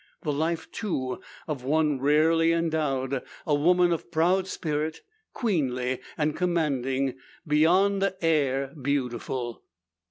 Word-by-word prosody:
The 150 - 0
life, 160 +3 -2
too, 130 - -3 0.3
of 145 -5 -4
one 150 0 +1
rarely 160 +4 +4
endowed; 150 -6 0 0.2
a 150 - +1
woman 175 +4 +4
of 165 - -5
proud 175 +3 +2
spirit, 155 -3 -3 0.3
queenly 130 - -1 0.2
and 150 0 0
commanding, 135 -7 0 0.3
beyond 190 +6 +3
air 140 -5 +1
beautiful. 125 -3 -2
150 Hz, 105 wpm, -27 LUFS, 135-165 Hz, 0.3 s, rarely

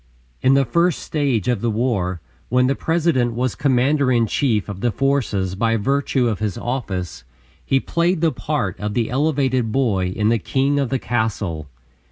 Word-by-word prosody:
In 130 +1 +4
the 135 0 +3
first 170 +4 +2
stage 140 - -1
of 120 -5 0
the 120 - 0
war, 105 -7 -1 0.3
when 125 +1 +3
the 135 - +2
President 155 -7 +1
was 125 0 0
commander 140 0 +2
in 120 -2 +3
chief 110 -3 0
of 100 -2 -7
the 120 - +2
forces 115 -9 0
by 115 +3 +1
virtue 135 +2 +1
of 110 -3 -1
his 105 -3 -2
office, 95 - -4 0.4
he 135 - +2
played 170 +5 0
the 165 0 +2
part 120 - -3
of 105 0 -3
the 115 -2 0
elevated 130 -4 +1
boy 105 -8 +1
in 105 +4 0
"The 115 0 +2
King 140 +6 0
of 135 -3 0
the 135 - 0
Castle." 105 - -2
125 Hz, 180 wpm, -21 LUFS, 105-140 Hz, 0.4 s, In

